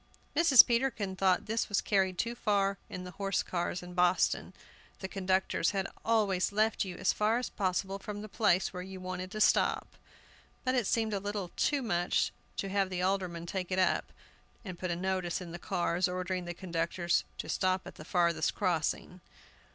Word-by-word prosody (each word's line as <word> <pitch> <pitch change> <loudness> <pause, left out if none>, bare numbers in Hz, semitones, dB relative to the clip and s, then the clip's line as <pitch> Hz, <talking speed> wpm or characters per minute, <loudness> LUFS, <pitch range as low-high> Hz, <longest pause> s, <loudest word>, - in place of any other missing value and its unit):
Mrs. 315 -7 +8
Peterkin 235 -5 0
thought 190 +1 +2
this 225 +2 -1
was 205 - +2
carried 190 -2 +1
too 235 +5 -1
far 200 -4 +1
in 185 - -6
the 180 - -8
horse 195 +1 -1
cars 175 0 -2
in 180 0 -9
Boston. 180 0 +2 0.5
The 190 - -5
conductors 190 -1 +1
had 190 - 0 0.2
always 205 -5 +2
left 215 +2 +2
you 185 -3 -6
as 185 - +2
far 215 +2 +2
as 250 - -2
possible 195 0 -1
from 205 +1 -6
the - - -6
place 195 -4 +2
where 180 - -5
you 190 +1 -8
wanted 185 0 -5
to 215 - -6
stop; - - +3 0.8
but 255 - +1
it 245 -6 +1
seemed 220 -2 +1
a 200 - 0
little 200 -3 -4
too 285 -2 +1
much 175 -6 +1 0.3
to 195 - -2
have 195 -1 +1
the 180 -1 -2
aldermen 185 -3 -1
take 185 +1 -4
it 185 - 0
up, 185 - +1 0.5
and 185 -3 -7
put 185 - -3
a 170 - 0
notice 185 -1 -1
in 180 -2 -8
the 175 - -7
cars, 175 0 0
ordering 180 0 -3
the 175 0 -5
conductors 175 -1 0
"to - - -5
stop 185 0 0
at - - -8
the - - -11
farthest 170 -2 +1
crossing." 180 0 -1
190 Hz, 190 wpm, -31 LUFS, 180-205 Hz, 0.8 s, Mrs